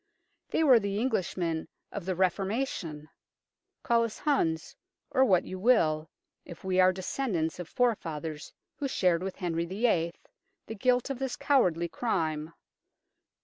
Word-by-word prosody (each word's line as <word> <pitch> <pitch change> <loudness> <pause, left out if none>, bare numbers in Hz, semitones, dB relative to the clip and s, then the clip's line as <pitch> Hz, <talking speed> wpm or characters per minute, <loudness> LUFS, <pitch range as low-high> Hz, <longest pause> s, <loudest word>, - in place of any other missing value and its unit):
They 320 - +1
were 260 -6 +7
the 200 -1 -2
Englishmen 180 -8 -1 0.2
of 200 -4 -6
the 185 - 0
Re 185 +1 +5
formation. 190 - -3 0.8
Call 235 -1 +3
us 230 -2 -4
Huns 165 - 0 0.4
or 265 - +4
what 185 -9 +4
you 185 - -6
will 160 -9 +3 0.3
if 170 - -11
we 185 -1 +1
are 185 0 +6
descendants 185 -4 -2
of 175 - -6
forefathers 160 -11 -1 0.3
who 280 - -2
shared 180 -9 +2
with 190 0 -4
Henry 170 -3 -2
VIII. 185 -3 +1 0.5
the - - -6
guilt 250 +4 +1
of 265 - -4
this 265 -2 -2
cowardly 180 - +2
crime. 160 -7 -2
185 Hz, 145 wpm, -29 LUFS, 165-240 Hz, 0.8 s, were